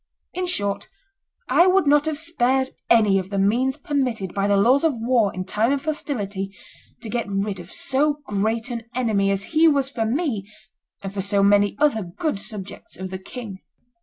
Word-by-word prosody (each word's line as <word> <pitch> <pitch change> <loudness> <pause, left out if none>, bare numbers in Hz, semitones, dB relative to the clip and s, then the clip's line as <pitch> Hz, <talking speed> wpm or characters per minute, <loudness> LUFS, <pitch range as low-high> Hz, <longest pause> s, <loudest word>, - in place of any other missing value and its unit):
In 365 0 -2
short, 200 - 0 0.6
I 345 - +5
would 375 -1 +4
not 290 +1 +4
have 310 -2 -1
spared 265 -5 0 0.2
any 210 -4 +5
of 185 0 -6
the 200 - -3
means 240 +7 +2
permitted 250 -10 -2
by 200 0 0
the 200 0 +3
laws 250 +8 +4
of 320 -5 +2
war 230 -3 +2
in 185 0 -5
time 215 +6 +1
of 280 +1 -1
hostility 205 -11 -3 0.5
to - - -5
get 235 -1 -2
rid 195 -1 -2
of 175 0 -11
so 285 +2 +1
great 220 +3 -1
an 230 -2 -5
enemy 215 -6 +1
as 195 0 0
he 320 +1 +6
was 280 -3 +2
for 225 -5 -1
me 230 - -2 0.5
and 195 0 -5
for 200 - -2
so 200 +1 +1
many 205 0 +4
other 290 -6 +2
good 195 - -3
subjects 205 -2 -9
of 185 0 -6
the 190 - -5
king." 200 -1 -8
225 Hz, 190 wpm, -23 LUFS, 200-275 Hz, 0.6 s, he